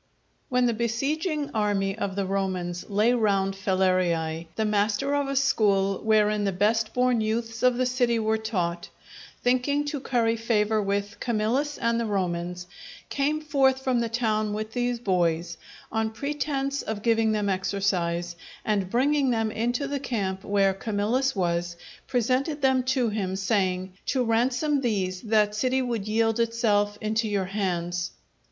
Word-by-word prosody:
_ - - -44 0.5
When 250 -2 +2
the 240 - +2
besieging 285 - -1
army 205 -2 0
of 200 -3 -3
the 200 -1 -1
Romans 185 -2 -2
lay 210 +4 +3
round 200 -4 +1
Falerii, 185 -4 0
the 220 - 0
master 210 +6 +1
of 285 -1 +1
a 275 - -2
school 200 -8 +2
wherein 215 -1 +2
the 200 - +1
best 215 +4 +1
born 250 -2 +2
youths 225 +1 -2
of 250 -1 +3
the 255 - +1
city 245 -2 +1
were 220 0 +1
taught, 175 -6 -2 0.5
thinking 255 +4 +1
to 290 -1 -3
curry 235 -3 +1
favour 220 -1 +1
with 200 0 -2
Camillus 245 +6 0
and 230 -1 +1
the 230 - -1
Romans, 180 -3 -2 0.4
came 295 +2 0
forth 270 -3 +2
from 255 -2 +1
the 230 -1 -1
town 215 -3 0
with 215 +1 -4
these 245 -1 0
boys, 170 -5 0 0.3
on 220 0 0
pretence 280 +2 -2
of 215 -2 -5
giving 225 -1 +3
them 210 -1 0
exercise, 185 -3 -1 0.3
and 200 -4 0
bringing 275 +4 +2
them 225 -2 0
into 240 +5 -1
the 280 0 -2
camp 200 -8 -3
where 195 -1 +2
Camillus 225 +6 0
was, 175 -2 -1 0.3
presented 260 +5 0
them 265 -1 +4
to 255 -2 +1
him, 195 -3 -2
saying, 190 -2 0
"_To 255 -3 +1
ransom 255 +5 +1
these 190 -6 -1
that 215 -2 +2
city 255 +4 +1
would 230 -5 -3
yield 225 +1 +1
itself 215 -3 +1
into 220 +1 0
your 200 -2 0
hands. 180 -3 -2
220 Hz, 155 wpm, -26 LUFS, 195-250 Hz, 0.5 s, them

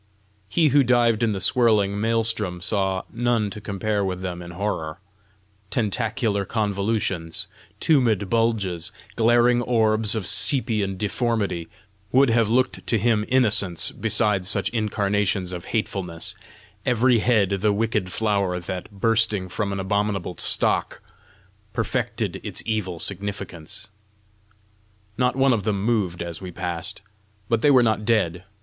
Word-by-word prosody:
He 160 - +3
who 140 +1 +5
dived 120 -2 +3
in 115 -2 +2
the 95 - -3
swirling 105 -2 +2
Maelstrom 110 -5 +1
saw 95 0 -1
none 115 -3 0
to 105 - -8
compare 100 +1 -2
with 95 -1 -3
them 90 -2 -5
in 85 - -9
horror: 85 -3 -3 0.7
tentacular 110 -1 -1
convolutions, 100 -5 -1 0.3
tumid 115 - +2
bulges, 110 -6 0 0.2
glaring 120 +1 +4
orbs 110 -2 +2
of 110 - -2
sepian 105 -6 +2
deformity, 105 -5 -1 0.4
would 130 -1 +4
have 115 -2 +2
looked 130 +3 0
to 115 - +2
him 110 0 +1
innocence 105 -9 +2
beside 100 -4 +1
such 100 - +1
incarnations 105 -4 -1
of 90 -1 -6
hatefulness 95 -6 -3 0.5
every 125 0 +3
head 110 -4 +2
the 105 +2 +2
wicked 105 -3 -1
flower 100 -4 0
that, 90 +1 -6
bursting 105 -2 +1
from 100 +2 -2
an 100 - -3
abominable 100 -2 -1
stalk, - - +1 0.7
perfected - - -2
its - - -3
evil 105 -6 -2
significance. 95 -3 -2 1.3
Not 125 0 +2
one 135 0 +3
of 110 - 0
them 100 -1 -1
moved 100 -7 0
as 85 0 -6
we 95 - -6
passed. 90 +2 -4 0.4
But 115 -1 +1
they 145 - +4
were 130 -3 +6
not 110 -2 +1
dead. 95 -6 0
105 Hz, 130 wpm, -23 LUFS, 95-115 Hz, 1.3 s, were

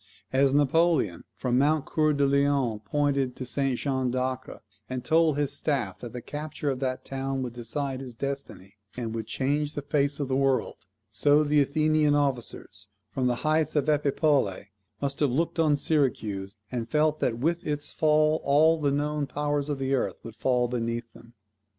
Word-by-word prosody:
As 135 +1 +4
Napoleon 145 - +2
from 125 -1 0
Mount 150 +1 +2
Coeur 155 -2 +2
de 140 -1 +2
Lion 140 -5 +2
pointed 140 +2 0
to 130 - -6
St. 130 +1 -1
Jean 130 -2 -1
d'Acre, 130 +1 -3 0.3
and 130 -1 -4
told 160 -2 +3
his 145 -1 0
staff 135 -10 -1
that 120 - -7
the 125 -2 -7
capture 150 -1 -4
of 130 - -4
that 130 -1 -2
town 135 0 -3
would 120 -2 -5
decide 130 +3 -3
his 125 -3 -8
destiny, 115 -7 -6 0.2
and 115 -2 -3
would 110 -1 -4
change 145 +2 -1
the 145 - -4
face 145 0 0
of 140 - -1
the 130 - 0
world; 135 -1 +1 0.3
so 145 +8 +4
the 150 0 +3
Athenian 150 +1 +2
officers, 140 -5 -3 0.2
from 130 -1 0
the 125 - +1
heights 155 0 +2
of 145 -1 +1
Epipolae, 140 - +1 0.3
must 140 0 -2
have 145 - +3
looked 165 +6 -1
on 155 -2 +4
Syracuse, 110 -10 -1 0.2
and 120 -2 -3
felt 155 0 +2
that 115 -2 0
with 165 +7 0
its 145 -1 -2
fall 155 0 +3
all 155 +3 +4
the 145 - +2
known 145 0 -1
powers 145 +1 -1
of 145 - -1
the 135 0 -1
earth 135 - 0
would 115 -1 -9
fall 125 -1 +1
beneath 115 -1 -3
them. 115 +1 -17
140 Hz, 180 wpm, -27 LUFS, 125-150 Hz, 0.3 s, As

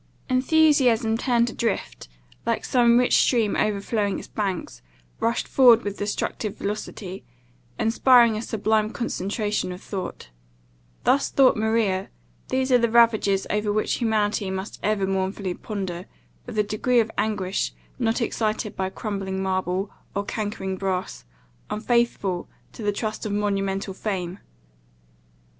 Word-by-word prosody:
Enthusiasm 255 -5 +4
turned 235 0 +2
adrift, 235 - -3 0.4
like - - -1
some 240 -2 +4
rich 250 0 +4
stream 225 -5 +3
overflowing 205 0 0
its - - -8
banks, 185 - -3 0.4
rushes 230 +1 0
forward 240 -4 +6
with 205 0 -4
destructive 205 0 -3
velocity, 200 -2 -5 0.5
inspiring 235 0 +5
a 215 - -3
sublime 220 -1 0
concentration 210 -3 -2
of 180 - -7
thought. 185 - -6 0.7
Thus 280 - +3
thought 270 -2 +5
Maria 215 -3 0 0.4
These 260 0 0
are 250 - +6
the 235 -1 +2
ravages 220 -4 +4
over 210 0 0
which 215 +1 0
humanity 215 -3 +1
must 190 +2 -5
ever 210 -2 +1
mournfully 190 0 -2
ponder, 185 -4 -5 0.4
with - - -6
a 210 - +4
degree 215 +4 +1
of 225 -1 +1
anguish 200 -3 -1 0.3
not 230 0 +1
excited 215 -2 -1
by 190 0 -1
crumbling 195 -2 -4
marble, 185 +1 -1 0.2
or 200 +1 -1
cankering 205 -3 -3
brass, 185 - -3 0.4
unfaithful 215 -5 0 0.2
to - - -10
the 205 -1 +1
trust 215 +1 -3
of 205 - -3
monumental 195 -1 -1
fame. 185 -2 -4
210 Hz, 130 wpm, -24 LUFS, 195-230 Hz, 0.7 s, forward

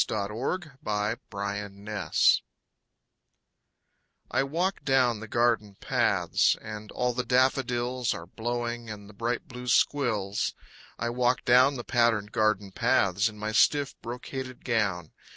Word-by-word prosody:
AMY 105 -1 -2
LOWELL 140 +11 -2 0.7
PATTERNS 100 +1 0 1.9
I 130 - +2
walk 170 +8 -1
down 125 -5 +3
the 110 - -8
garden 115 -3 +1
paths, - - +2
And 105 0 -8
all 125 0 0
the 125 +1 -1
daffodils 125 -1 +1
Are 85 - -5
blowing, 120 +3 -4
and 105 -1 -8
the 105 - -13
bright 115 +3 -2
blue 125 -2 -8
squills. 110 -7 +1 0.4
I 120 0 -2
walk 125 +1 +1
down 130 +3 +5
the 120 - -5
patterned 115 -4 +1
garden 110 -2 +1
paths 100 +3 +2
In 105 - -13
my 105 +1 -3
stiff, 140 +5 +3
brocaded 130 +1 -7
gown. 100 -9 0
120 Hz, 125 wpm, -28 LUFS, 105-125 Hz, 1.9 s, down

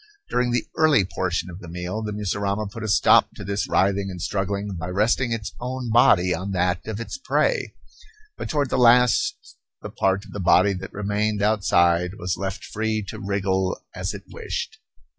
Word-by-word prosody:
During 125 0 +1
the 120 0 0
early 155 -10 +4
portion 90 0 -2
of 85 - -9
the 90 - -11
meal, 90 +5 -4
the 105 -1 -4
mussurama 100 0 -2
put 115 - -8
a 110 - -3
stop 105 - +5
to - - -8
this 100 +1 -2
writhing 100 0 +2
and 90 -1 -7
struggling 100 +2 -2
by 85 0 -5
resting 110 +6 +1
its 115 -3 -3
own 125 -1 -4
body 105 -7 +5
on 95 +4 -4
that 90 0 0
of 110 -1 -4
its 115 - -6
prey; - - 0 0.6
but - - -6
toward 145 -4 0
the - - +1
last 125 - +3 0.3
the - - -6
part 95 +1 0
of - - -13
the 105 - -6
body 95 +2 +4
that 95 0 -7
remained 105 +1 -1
outside 90 -4 +2
was 90 -2 -2
left 95 0 -5
free 110 0 -2
to - - -7
wriggle 95 -1 -1
as - - -4
it - - -9
wished. - - -5
100 Hz, 185 wpm, -23 LUFS, 95-110 Hz, 0.6 s, stop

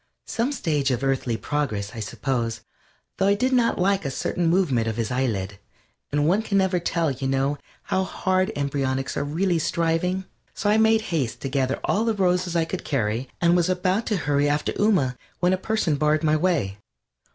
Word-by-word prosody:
Some 240 +4 -1
stage 150 - 0
of 125 0 -1
earthly 130 -4 0
progress, 110 -8 -2
I 115 - -7
suppose, 115 +1 -2 0.6
though 195 - +2
I 200 - +4
did 255 +5 0
not 240 -2 +3
like 195 +1 +2
a 140 - -2
certain 170 +5 -1
movement 160 -10 +2
of 110 0 -2
his 115 -1 -2
eyelid, 105 -6 -1 0.5
and 145 +1 +1
one 195 +6 +2
never 190 -3 +2
can 170 - -16
tell, 165 -3 +1
you 135 +1 -3
know, 135 +2 0 0.2
how 190 - 0
hard 185 0 0
embryonics 135 -2 -1
are 140 - 0
really 170 +4 0
striving. 170 +3 0 0.3
So 205 +1 +1
I 215 - +4
made 220 0 +4
haste 135 -8 -1
to 135 - -3
gather 130 0 0
all 215 - +1
the 225 -1 +1
roses 180 -2 +1
I 165 -1 +2
could 180 +3 -5
carry, 120 -1 -1
and 170 0 +4
was 175 0 +2
about 185 +4 0
to 210 - +1
hurry 145 -2 +1
after 145 +1 0
Ooma, 180 - +2 0.2
when 180 +1 +3
a - - +2
person 190 -6 0
barred 155 +2 +2
my 155 -1 +3
way. 150 - 0
155 Hz, 195 wpm, -24 LUFS, 135-185 Hz, 0.6 s, I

